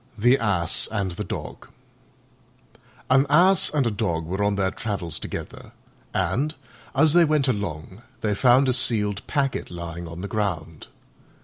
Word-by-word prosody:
THE 120 +5 +4
ASS 90 -7 +1
AND 100 -4 -2
THE 85 - -5
DOG - - -7 1.4
An 135 +2 +4
Ass 180 +5 +5
and 145 -4 0
a 115 - +1
Dog 85 -6 -2
were 95 +5 -3
on 100 0 +1
their 95 -1 0
travels 95 -7 -3
together, - - -8 0.4
and, 150 +5 -1 0.4
as 155 +2 +4
they 175 0 +6
went 150 -3 +2
along, 95 -4 -4 0.2
they 105 -1 0
found 125 +5 +4
a 130 - +3
sealed 105 -5 0
packet 140 -3 -1
lying 85 -1 -7
on 85 +2 -8
the 100 - -4
ground. 85 -8 -3
105 Hz, 150 wpm, -24 LUFS, 90-135 Hz, 1.4 s, they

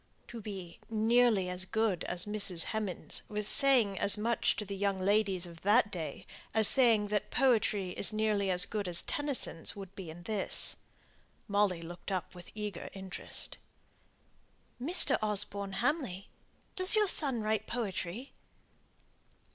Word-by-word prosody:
To 235 -1 -8
be 190 -5 -8
nearly 225 -2 +3
as 180 0 -2
good 210 -2 -1
as 175 0 -3
Mrs. 200 -5 0
Hemans' 210 -5 -2
was 210 0 0
saying 240 -9 +3
as 200 +1 +4
much 230 +2 +1
to 210 - -4
the 200 0 -6
young 195 -1 -1
ladies 195 -1 +1
of 170 -1 -11
that 210 +2 +3
day, 160 -6 -6 0.3
as 220 -2 +8
saying 225 -6 +4
that 210 -1 -1
poetry 215 -7 +1
is 195 - +2
nearly 215 -2 0
as 180 -1 +3
good 210 -3 -4
as 175 -1 +1
Tennyson's 280 - -1
would 195 -2 -9
be 185 -4 -8
in 170 +2 -10
this. 205 0 -1 0.7
Molly 200 -4 +1
looked 175 +4 -8
up 185 -2 -3
with 175 -1 -12
eager 210 -4 -5
interest. 190 -2 -6 1.2
"Mr. 295 -1 +4
Osborne 205 -2 0
Hamley? 235 - -2 0.5
Does 370 +2 +2
your 425 -1 +3
son 270 - +3
write 215 0 -1
poetry?" 225 +1 -4
205 Hz, 145 wpm, -31 LUFS, 185-220 Hz, 1.2 s, as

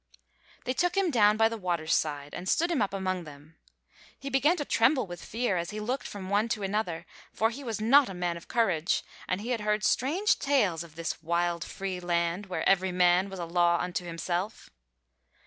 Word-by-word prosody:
They 255 - -1
took 355 +6 0
him 385 -4 +2
down 210 -4 +4
by 225 0 +5
the 225 0 -5
water's 170 -4 -1
side 145 -2 -1
and 185 +1 -5
stood 340 +2 +2
him 315 - +1
up 205 - +1
among 185 -2 -2
them. 150 +1 -14 0.6
He 275 0 -7
began 290 +7 +3
to 290 - -3
tremble 260 +4 +3
with 175 -2 -9
fear 225 -4 -1
as 170 0 -3
he 215 - -5
looked 245 +6 -3
from 195 -2 -7
one 205 +4 +1
to 210 -2 -2
another, 195 -4 -2 0.3
for 225 +1 +1
he 275 +4 -8
was 225 -4 -3
not 250 +4 +5
a 190 - -6
man 175 -1 -1
of 170 - -11
courage, 190 -8 +1 0.2
and 185 +2 -1
he 235 +4 -4
had 235 -3 -1
heard 210 0 0
strange 340 - +2
tales 205 - +1
of 160 -2 -15
this 165 -1 -4
wild, 170 +1 0
free 190 0 -5
land, 175 +2 -1
where 185 - -2
every 190 -1 +3
man 180 +1 +3
was 190 - -7
a 175 - -4
law 170 0 +3
unto 180 0 -2
himself. 175 +4 -4
195 Hz, 210 wpm, -28 LUFS, 175-230 Hz, 0.6 s, by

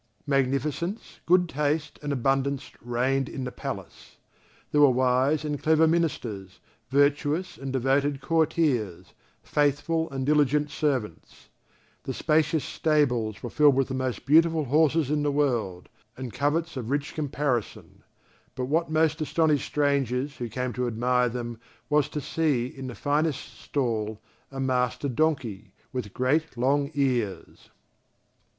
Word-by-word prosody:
Magnificence, 145 - -1
good 180 +1 +4
taste, 150 0 -1
and 145 -1 -3
abundance 135 +1 0
reigned 125 +3 0
in 135 - -5
the 125 - -4
palace; - - -8 0.5
there 150 - +3
were 145 - +8
wise 130 +4 +2
and 150 -1 -3
clever 160 +1 +4
ministers, 120 - -2 0.3
virtuous 145 +6 +1
and 135 -1 -6
devoted 135 +2 +1
courtiers, 140 - 0 0.3
faithful 150 +3 0
and 135 -1 -3
diligent 150 0 +2
servants. 130 - -3 0.5
The 130 - -5
spacious 155 -1 +1
stables 125 -9 0
were 120 - -5
filled 145 -3 +5
with 135 0 +1
the - - -3
most 130 -1 -3
beautiful 160 +2 +4
horses 150 +1 +2
in 150 -1 +1
the 145 0 +1
world, 120 -11 -1 0.3
and 130 -4 -6
coverts 155 +5 0
of 120 -3 -5
rich 145 +1 -1
caparison; 140 -6 -3 0.5
but 130 - -2
what 160 +5 0
most 155 0 +1
astonished 155 -1 +1
strangers 140 -2 0
who 120 -1 -4
came 125 +2 -3
to 125 0 -1
admire 125 +2 +1
them 120 -1 -5 0.3
was 150 -1 +3
to 150 - -4
see, 145 -6 0
in 130 +1 -7
the 125 - -7
finest 145 0 -1
stall, 110 -6 -2 0.3
a 135 - -7
master 130 +1 0
donkey, 125 -7 -1 0.2
with 125 -6 -4
great 140 +5 0
long 140 +3 +1
ears. 125 -8 -2
140 Hz, 135 wpm, -26 LUFS, 125-150 Hz, 0.5 s, were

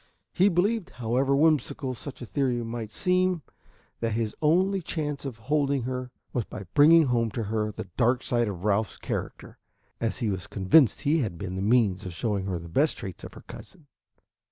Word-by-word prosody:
He 195 +2 +4
believed, 200 +2 +1
however 125 +4 +1
whimsical 150 -3 +1
such 130 +1 -8
a - - -5
theory 125 -1 -1
might 115 -2 -5
seem, 185 -1 +1 0.6
that 115 -1 -1
his 110 -1 -2
only 185 +5 +3
chance 150 -4 -3
of 130 -4 -5
holding 140 +2 0
her 125 0 -4 0.2
was 120 -4 -1
by 100 - -8
bringing 160 +3 +7
home 120 -3 +1
to 115 +2 -3
her 105 0 -1
the 100 - -7
dark 125 +1 +2
side 120 -1 +1
of 95 -3 -5
Ralph's 105 -1 +1
character, - - -6 0.4
as 115 - -1
he 110 -4 -1
was 95 -3 -4
convinced 100 +7 +4
he 155 +3 +2
had 105 - -2
been 95 +1 -5
the 95 - -3
means 105 -3 +2
of 90 - -6
showing 100 -1 -1
her 95 -2 -1
the 85 0 -8
best 140 - +1
traits 95 -3 -7
of - - -9
her - - -12
cousin. 170 -5 -12
125 Hz, 190 wpm, -27 LUFS, 105-150 Hz, 0.6 s, bringing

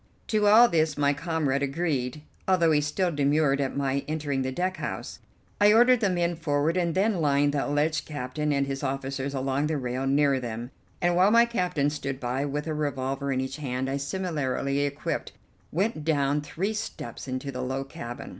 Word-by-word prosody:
To 210 -2 +2
all 225 +4 +8
this 160 -6 +1
my 145 0 +3
comrade 145 -3 -1
agreed, 140 -2 -2 0.2
although 175 -4 +4
he 150 -1 +3
still 175 +5 0
demurred 145 -1 +2
at 135 0 -2
my 140 0 0
entering 145 -3 -1
the 130 0 -2
deck 185 +6 -2
house. - - -5 0.4
I 205 0 +6
ordered 245 +2 +6
the 205 -3 +2
men 175 -1 0
forward 150 0 0
and 170 -3 0
then 195 -2 +2
lined 145 -1 +2
the 145 - 0
alleged 150 +2 0
captain 150 +1 -3
and 140 -1 +1
his 135 0 -4
officers 135 0 -3
along 135 +2 0
the 155 -1 -1
rail 130 0 -2
near 140 -1 +3
them, 120 0 -5 0.3
and, 175 0 +3
while 185 +3 +5
my 235 +2 +6
captain 180 -11 0
stood 140 -3 -4
by 130 +2 -1
with 145 +1 -3
a 160 - -2
revolver 140 -2 -2
in 130 -1 0
each 130 +2 -4
hand, 130 -3 -3
I, 140 - -1
similarly 140 -3 -2
equipped, 145 0 -2 0.4
went 190 -1 -1
down 145 -2 +1
three 180 +8 -3
steps 140 - -6
into 130 +2 -4
the 125 - -5
low 130 +1 -2
cabin. 120 -3 -8
145 Hz, 190 wpm, -27 LUFS, 135-165 Hz, 0.4 s, all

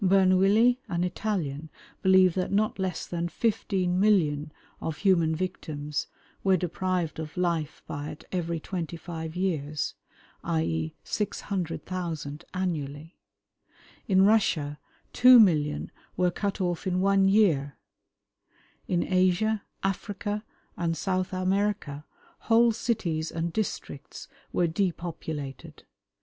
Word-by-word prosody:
Bernouilli, 195 +6 +5
an 175 -1 0
Italian, 170 -6 -2 0.3
believed 190 -1 +5
that 185 -1 -1
not 210 +1 +1
less 185 -3 -2
than 170 0 -3
15,000,000 180 -6 +1 0.3
of 160 -2 -3
human 170 -5 +3
victims 155 -5 -3 0.4
were 190 -1 +4
deprived 180 -1 -2
of 160 +2 -6
life 170 -4 -1
by 145 0 -5
it 155 +1 -9
every 170 -2 -1
twenty 170 -1 -4
five 160 -1 -6
years, 155 -5 -1 0.5
i. 80 0 0
e., 80 -1 -2
600,000 175 -6 -3
annually. 160 -3 -3 0.9
In 190 -3 +5
Russia 160 -9 +2 0.3
2,000,000 185 -13 +6 0.3
were 180 0 +3
cut 200 +3 -2
off 180 0 -1
in 185 0 +1
one 195 0 +4
year. 165 -9 +3 1.1
In 175 -1 +1
Asia, 185 +4 +2 0.2
Africa, 205 +2 -2 0.3
and 165 -1 -1
South 185 -2 -1
America, 185 -5 -1 0.3
whole 230 +1 +4
cities 175 -9 -1
and 165 0 -2
districts 215 +1 -4 0.2
were 175 - +2
depopulated. 160 -5 -4
180 Hz, 110 wpm, -27 LUFS, 160-195 Hz, 1.1 s, 2,000,000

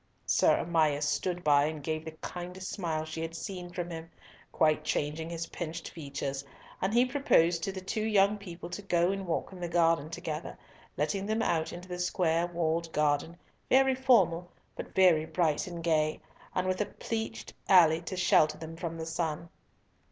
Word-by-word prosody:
Sir - - +4
Amias 155 -3 +2
stood 180 +2 -1
by 145 -1 +5
and 155 -1 -4
gave 155 +1 -2
the 160 - -6
kindest 180 +1 -6
smile 160 -5 -2
she 160 +1 -5
had 165 0 -4
seen 180 -1 -6
from 175 -1 -5
him, 165 0 -7 0.4
quite 155 -1 +2
changing 155 +2 -2
his 165 0 -4
pinched 165 -1 -6
features, 140 -3 -5 0.4
and 190 - +1
he 240 +3 +4
proposed 210 - +3
to 195 - -2
the 190 -1 -6
two 205 +3 -3
young 210 -1 +3
people 175 -3 -8
to 180 - -5
go 175 -2 +2
and 195 -1 -4
walk 170 - -2
in 185 - -10
the 175 - -3
garden 165 -3 +2
together, 165 -2 -5 0.4
letting 195 0 -1
them 220 +1 0
out 160 -1 0
into 175 +1 -9
the 180 -1 -5
square 175 -1 +1
walled 165 -1 -1
garden, 150 +2 +1 0.3
very 265 0 +5
formal, 195 -10 +3 0.3
but - - -8
very 175 -4 +5
bright 160 -3 0
and 170 -2 -6
gay, 155 -2 +1 0.4
and 185 0 0
with 185 +2 0
a 210 - 0
pleached 220 +1 -5 0.2
alley 165 -4 +6
to 180 +2 -6
shelter 155 -3 +4
them 160 0 -8
from 165 -1 -5
the 160 - -4
sun. 165 0 -3
170 Hz, 180 wpm, -30 LUFS, 160-185 Hz, 0.4 s, alley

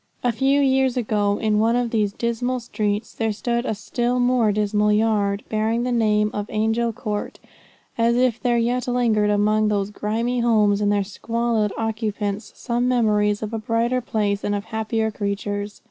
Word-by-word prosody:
A 245 - +2
few 270 +5 +2
years 265 -2 +2
ago 210 -3 +1
in 215 -1 +1
one 225 +2 +3
of 245 -1 0
these 210 -3 +1
dismal 240 +3 -2
streets 215 -2 -3
there 225 -1 -1
stood 235 +3 -2
a 220 - -1
still 240 +4 -1
more 245 -3 +3
dismal 210 0 +1
yard, 210 -2 +1
bearing 220 +2 0
the 250 - -1
name 210 -2 +2
of 205 0 -3
Angel 225 +2 0
Court, 210 -3 -4 0.6
as 230 +1 +3
if 245 -2 +1
there 240 -1 +2
yet 245 +2 0
lingered 230 -4 +2
among 210 +1 +2
those 205 -1 -1
grimy 230 +4 -1
homes 210 -3 +3
and 205 0 +2
their 205 -1 +2
squalid 225 +1 -1
occupants 215 -2 -3
some 240 0 -1
memories 210 -4 +2
of 215 +1 -5
a 225 - -2
brighter 230 +3 0
place 205 -3 -1
and 205 - 0
of 200 - -3
happier 220 0 -2
creatures. 205 0 -4
220 Hz, 175 wpm, -22 LUFS, 210-235 Hz, 0.6 s, one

